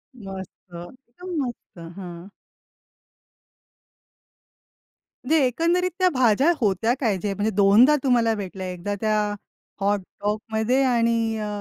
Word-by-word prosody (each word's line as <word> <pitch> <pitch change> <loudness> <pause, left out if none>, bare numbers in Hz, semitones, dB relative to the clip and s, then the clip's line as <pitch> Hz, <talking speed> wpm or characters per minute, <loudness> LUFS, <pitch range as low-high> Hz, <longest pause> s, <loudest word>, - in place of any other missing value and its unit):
मस्त 190 -4 -10
एकदम 250 - -11
मस्त! 240 -6 -8 0.2
हं. 175 -2 -9 3.0
म्हणजे 315 +5 +3
एकंदरीत 340 +8 +1
त्या 370 - +4
भाज्या 255 +5 +3
होत्या 220 +1 +1
काय? 220 -7 +1
जे 200 +2 -3
म्हणजे 205 +2 -1
दोनदा 210 +9 +6
तुम्हाला 235 -4 +3
भेटल्या 190 -2 -6
एकदा 180 +3 -4
त्या 215 -1 +1 0.6
हॉटडॉगमध्ये 215 +5 -1
आणि 230 -3 +1
अ, 215 - -3
220 Hz, 105 wpm, -23 LUFS, 195-250 Hz, 3.0 s, दोनदा